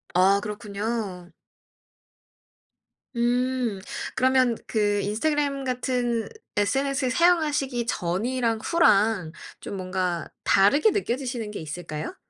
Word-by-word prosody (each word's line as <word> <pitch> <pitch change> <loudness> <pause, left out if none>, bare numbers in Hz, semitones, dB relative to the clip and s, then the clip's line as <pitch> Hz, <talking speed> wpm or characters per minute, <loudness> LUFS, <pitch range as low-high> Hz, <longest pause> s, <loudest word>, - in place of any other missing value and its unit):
아 195 +2 +5
그렇군요. 210 -3 -4 1.8
음 245 -2 0 0.4
그러면 255 -2 +3
그 205 -2 +1
인스타그램 280 +5 0
같은 245 -2 -1 0.3
SNS 265 +6 +1
사용하시기 295 -8 +2
전이랑 225 +6 -1
후랑 210 - +3 0.3
좀 200 - -6
뭔가 185 -2 -2 0.2
다르게 205 - +4
느껴지시는 245 - -2
게 - - -6
있을까요? 155 - -6
230 Hz, 225 characters per minute, -25 LUFS, 200-260 Hz, 1.8 s, 아